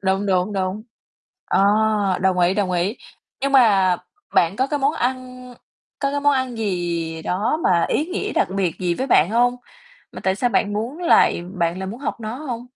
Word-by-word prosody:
Đúng, 195 +1 0
đúng, 185 +1 +1
đúng. 190 +2 -2 0.6
Ờ, - - +1 0.6
đồng 185 -1 +1
ý, 175 +2 +3
đồng 200 -3 0
ý. 180 +6 -1 0.4
Nhưng 275 +1 -1
mà 195 -8 +5 0.4
bạn 170 +4 +3
có 260 - +1
cái 290 +1 -2
món 280 +2 +1
ăn 255 -1 -4 0.4
có 275 -1 -1
cái 285 0 -2
món 290 0 +3
ăn 260 -3 -1
gì 170 -5 -3
đó 205 - -1
mà 170 -2 +3
ý 305 - 0
nghĩa 390 +3 -3
đặc - - +1
biệt 180 -4 -1
gì 175 -2 0
với 260 +9 -3
bạn 180 - +4
hông? 245 +2 +2 0.6
Mà - - -8
tại 190 - +1
sao 245 +5 0
bạn 205 -1 +1
muốn 230 +9 -4
lại 340 - +3
bạn 170 0 -1
lại 190 - -4
muốn 220 +7 -7
học 265 - -4
nó 220 +2 -5
hông? 250 -4 -6
210 Hz, 200 wpm, -21 LUFS, 185-255 Hz, 0.6 s, mà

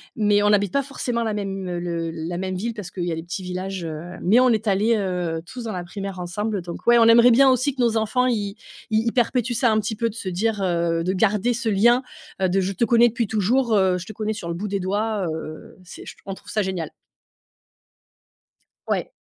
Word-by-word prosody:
mais 205 -1 +3
on 205 - +4
n'habite 205 -3 +2
pas 280 - +1
forcément 245 -3 -3
la 220 - -1
même, 195 -2 -4
heu, 175 -1 -3
le 170 -1 -3
la 165 +1 -5
même 185 +1 -3
ville 225 +5 -3
parce 200 -5 -7
qu'il 180 - -4
y 175 - -2
a - - -1
les 165 - -6
petits 175 +2 -5
villages, 185 0 -5
heu 165 +2 -6
mais 215 +7 +4
on 255 0 +5
est 220 -1 0
allés, 210 +4 +3
heu, 180 -5 -2
tous 250 -2 -7
dans 225 - -4
la 180 -2 -4
primaire 195 +1 -6
ensemble 200 +3 -3
donc, 170 0 -8
ouais, 240 0 +6
on 230 - +6
aimerait 235 +2 +7
bien 265 +3 +6
aussi 255 +2 +2
que 255 - -2
nos 230 -2 +2
enfants, 250 +4 +1
ils 205 -5 -1 0.4
ils 220 +1 +2
ils 230 - +2
perpétuent 245 0 +1
ça 240 -2 +3
un 215 - +2
petit 215 +1 -3
peu 230 +2 0
de 215 - -11
se 200 -5 -4
dire, 205 +3 -1
heu, 170 -2 0
de 185 - 0
garder 210 +4 +2
ce 240 0 -4
lien, 235 +5 +4 0.4
heu, 185 - +4
de, 190 +2 +1
je 190 +2 -2
te 230 +5 +1
connais 235 0 +5
depuis 235 0 -1
toujours, 220 +4 +1
heu, 190 -2 +3
je 180 - -7
te 215 - -9
connais 215 +1 -2
sur 170 -5 -6
le - - -2
bout 190 +5 -4
des 200 0 -2
doigts, 205 +1 -1
heu, 155 +2 -8
c'est 180 - -11
je - - -8
on 195 - -4
trouve 205 +1 -13
ça 210 0 +1
génial. 185 -5 -3 2.0
Ouais. - - -1
205 Hz, 245 wpm, -23 LUFS, 180-230 Hz, 2.0 s, aimerait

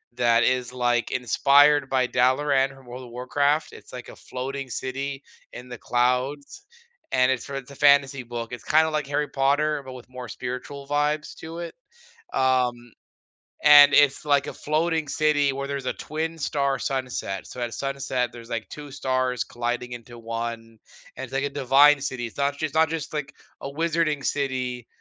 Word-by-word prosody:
that 120 -1 +3
is, 125 0 +1
like, 120 -1 0
inspired 140 +3 +4
by 130 -1 +2
Dalaran 135 +2 +2
from 135 -1 -17
World 125 +1 -9
of 125 - -11
Warcraft. 140 +5 0
It's - - -14
like 125 -1 -8
a - - -11
floating 135 +1 -6
city 135 +3 -4 0.3
in 125 +1 -10
the 125 - -7
clouds, 130 - -1 0.5
and 130 0 +3
it's 130 -2 -2
for 140 - -7
it's 135 0 -7
a - - -11
fantasy 140 -2 +4
book, 120 -1 -6
it's 125 - -7
kinda 160 +1 +3
like 150 -2 -2
Harry 145 +1 -1
Potter, 145 +2 +1
but 130 -1 -9
with 125 -1 -12
more 125 -2 -8
spiritual 130 +5 -6
vibes 150 +1 -1
to 165 +1 -8
it. 170 -1 -6 0.6
Um, 125 -2 +1 0.7
and 145 -1 +9
it's 145 -2 +4
like 145 -2 +2
a - - -5
floating 160 +1 -1
city 145 -2 +2
where 140 +1 -4
there's 140 -1 -4
a - - 0
twin 160 +2 -4
star 140 -3 -1
sunset. 130 -7 -3
So, - - -9
at 120 -1 -3
sunset, 135 -1 -2
there's, 115 0 -12
like, 115 -2 -4
2 145 -1 -9
stars 130 -3 -1
colliding 120 +1 -4
into 120 0 -10
1, 115 0 -5 0.4
and - - -5
it's 130 - -15
like 135 0 0
a - - -2
divine 140 +1 +5
city. 130 -3 -3
It's 115 - -15
not 140 0 +1
just 140 - -8
it's 155 -3 -2
not 160 0 +4
just, 160 -3 -4
like, 150 -2 -4 0.3
a 135 - -5
wizarding 160 -1 0
city 130 -3 -2
135 Hz, 180 wpm, -25 LUFS, 125-145 Hz, 0.7 s, and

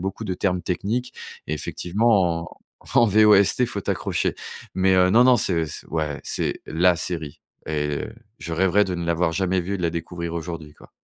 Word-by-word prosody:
beaucoup 95 +3 -4
de 95 -3 -2
termes 90 -1 -1
techniques. 110 +8 -3 0.3
Et 80 - -2
effectivement 90 +1 +1
en 85 - -12 0.4
en 115 - +5
VOST, 105 +3 +5
faut 105 -4 -3
t'accrocher. - - -1 0.4
Mais, 95 0 +3
heu, 90 0 +5
non 115 +6 +5
non, 125 -1 +5
c'est 85 -5 +1 0.2
ouais 75 -3 -2
c'est - - -2
la 85 +2 +3
série 80 -4 -4 0.3
et 75 -2 -2 0.3
je 80 +2 -6
rêverais 95 +4 +3
de 95 - -3
ne 85 -1 -4
l'avoir 85 0 +1
jamais 95 +1 0
vu, 95 +3 -3
et - - -1
de 90 - -6
la 85 - +1
découvrir 85 0 -5
aujourd'hui 80 -2 -6
quoi. - - -18
90 Hz, 185 wpm, -23 LUFS, 85-100 Hz, 0.4 s, en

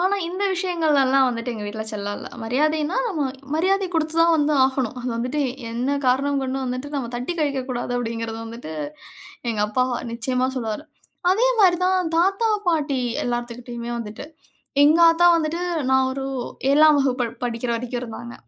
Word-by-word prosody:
ஆனா, 380 +3 +2
இந்த 370 +3 -2
விஷயங்கள்ல 335 -6 +2
எல்லாம் 270 0 +4 0.3
எங்க 215 -2 -6
வீட்ல 220 +1 -4
செல்லம் 205 -1 -4
இல்ல. - - -8
மரியாதைனா 300 - 0
நம்ம 330 -8 -2 0.3
மரியாதை 380 +4 +2
குடுத்துத் 320 0 +1
தான் 335 0 +5
வந்து 300 0 +2
ஆகணும். 265 -2 -1
அத 245 - -6
வந்துட்டு 255 +6 -2 0.3
என்ன 255 +5 -1
காரணம் 275 +2 +2
கொண்டும் 265 0 -2
வந்துட்டு 255 +2 -4
நாம 255 -4 -3
தட்டிக் 250 +9 -3
கழிக்கக் 275 -3 -1
கூடாது 245 0 -3
அப்டிங்கறது 230 -1 -4
வந்துட்டு, 225 -8 -8 0.8
எங்க 215 -2 -2
அப்பா 255 +4 +1 0.3
நிச்சயமா 255 +2 0
சொல்லுவாரு. 225 +4 -3 0.5
அதே 470 +6 +3
மாதிரி 365 -3 +6
தான் 370 -3 +1
தாத்தா, 390 +6 +2 0.2
பாட்டி 295 -5 +1 0.3
எல்லாத்துக்கிட்டயுமே 240 0 -4
வந்துட்டு, 220 +3 -7 0.6
எங்க 310 +3 +5
ஆத்தா 340 +1 +4
வந்துட்டு 330 +2 -1 0.3
நான் 265 0 +4
ஒரு 270 0 -4 0.5
7 305 +1 +6
வகுப்பு 255 -3 +1 0.2
படிக்கிற 235 0 -2
வரைக்கும் 245 +1 -4
இருந்தாங்க. 235 0 -7
265 Hz, 155 wpm, -23 LUFS, 240-315 Hz, 0.8 s, மாதிரி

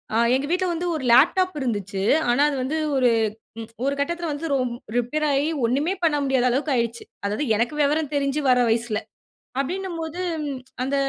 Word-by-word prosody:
ஆ - - +3 0.2
எங்க 270 +2 -1
வீட்ல 365 +2 +1
வந்து 350 +2 -2
ஒரு 280 - -4
லேப்டாப் 365 +9 +5
இருந்துச்சு. 205 -6 -2 0.3
ஆனா 245 +4 +3
அது 290 - -2
வந்து 290 +5 -2 0.2
ஒரு 250 -2 +4 0.7
ஒரு 280 - +1
கட்டத்துல 340 +3 -2
வந்து 290 +3 -4 0.5
ரிப்பேராயி 285 +3 +1 0.2
ஒண்ணுமே 285 +10 +1
பண்ண 315 -3 +3
முடியாத 265 -2 +2
அளவுக்கு 275 +5 0
ஆயிருச்சு. 235 -1 -1 0.2
அதாவது 210 +8 -1
எனக்கு 235 +6 0
விவரம் 295 +1 +1
தெரிஞ்சு 280 +1 0
வர 250 -1 +5
வயசுல. 225 -1 0 0.6
அப்டின்னும் 355 +4 -4
போது 320 +3 -5 0.6
அந்த 270 +2 -1
280 Hz, 155 wpm, -23 LUFS, 245-320 Hz, 0.7 s, லேப்டாப்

